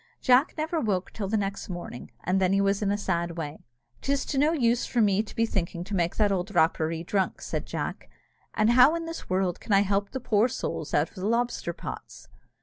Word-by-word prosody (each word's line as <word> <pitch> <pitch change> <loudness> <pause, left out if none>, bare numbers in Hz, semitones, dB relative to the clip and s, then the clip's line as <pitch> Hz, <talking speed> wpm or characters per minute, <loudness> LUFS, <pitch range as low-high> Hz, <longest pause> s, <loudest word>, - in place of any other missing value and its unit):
Jack 255 +3 +4
never 320 +2 -1
woke 195 -8 -1
till 205 -3 -3
the 220 +3 +1
next 200 -1 -3
morning, 175 -9 -7
and 185 +2 +1
then 185 0 +3
he 195 - +3
was 200 0 +1
in 205 - +1
a 205 - +1
sad 170 -4 -2
way. 150 -5 -6 0.3
"'Tis 275 0 0
to 270 - -1
no 300 +3 +4
use 245 -6 +2
for 245 - -1
me 205 -2 +4
thinking 195 -6 -2
to 195 +3 -8
make 175 -3 0
that 210 -2 +2
old 190 +1 -1
Rapparee 160 0 +2
drunk," 190 +2 -1
said - - -4
Jack, - - -4 0.5
"and 215 +2 +3
how 255 +6 +7
in 335 0 -3
this 330 0 -7
world 185 -1 0
can 210 - -2
I 195 - +6
help 200 0 0
the 265 - -4
poor 225 -2 +2
souls 160 - -4
out 145 +2 +2
of - - -25
the 185 +2 -2
lobster 235 -5 0
pots?" - - -9
200 Hz, 220 wpm, -27 LUFS, 180-235 Hz, 0.5 s, how